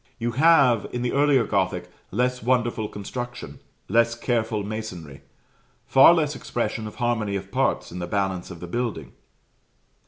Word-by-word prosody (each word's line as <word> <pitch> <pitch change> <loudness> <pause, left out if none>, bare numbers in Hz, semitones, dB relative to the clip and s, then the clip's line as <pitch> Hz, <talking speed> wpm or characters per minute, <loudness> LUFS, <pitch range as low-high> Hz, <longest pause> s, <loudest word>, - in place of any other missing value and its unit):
You 120 0 -2
have, 135 -4 +4
in 125 0 -3
the 125 - 0
earlier 140 -3 +3
Gothic, 95 -3 -1 0.2
less 125 +4 0
wonderful 120 -2 0
construction, 120 +5 -7 0.3
less 115 +3 +2
careful 115 -3 -1
masonry, 90 -10 -7 0.6
far 135 +4 +7
less 150 -3 0
expression 115 -2 -3
of 105 - -10
harmony 115 -5 -1
of 100 0 -5
parts - - 0
in 90 - -6
the 85 - -4
balance 95 -2 -2
of 85 -3 -10
the - - -5
building. 120 +4 -3
115 Hz, 150 wpm, -24 LUFS, 100-125 Hz, 0.6 s, far